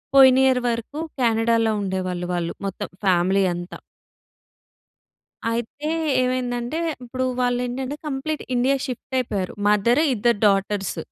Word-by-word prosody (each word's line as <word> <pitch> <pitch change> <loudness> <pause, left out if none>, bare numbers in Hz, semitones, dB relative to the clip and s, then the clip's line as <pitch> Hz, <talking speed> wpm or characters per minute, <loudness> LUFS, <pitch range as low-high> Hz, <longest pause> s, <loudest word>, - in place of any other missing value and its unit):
పోయిన 265 -1 +8
ఇయర్ 255 -1 +3
వరకు 235 +6 -4 0.2
కెనడాలో 230 -1 +2
ఉండేవాళ్ళు 185 -2 -2
వాళ్ళు. 170 -1 -2
మొత్తం 195 - -5 0.2
ఫ్యామిలీ 190 +2 +3
అంతా... 175 +1 -7 1.7
అయితే, 240 +6 -3 0.3
ఏమైందంటే 250 +2 -2 0.3
ఇప్పుడు 255 +1 -3 0.2
వాళ్ళు 245 0 +1
ఏంటంటే, 260 +3 -4
కంప్లీట్ 295 +2 -3
ఇండియా 260 +3 +3
షిఫ్ట్ 260 +1 -7
అయిపోయారు. 200 -7 -2
మదర్, 220 +7 +3
ఇద్దరు 235 -1 +2
డాటర్స్. 195 -1 0
235 Hz, 115 wpm, -23 LUFS, 195-255 Hz, 1.7 s, పోయిన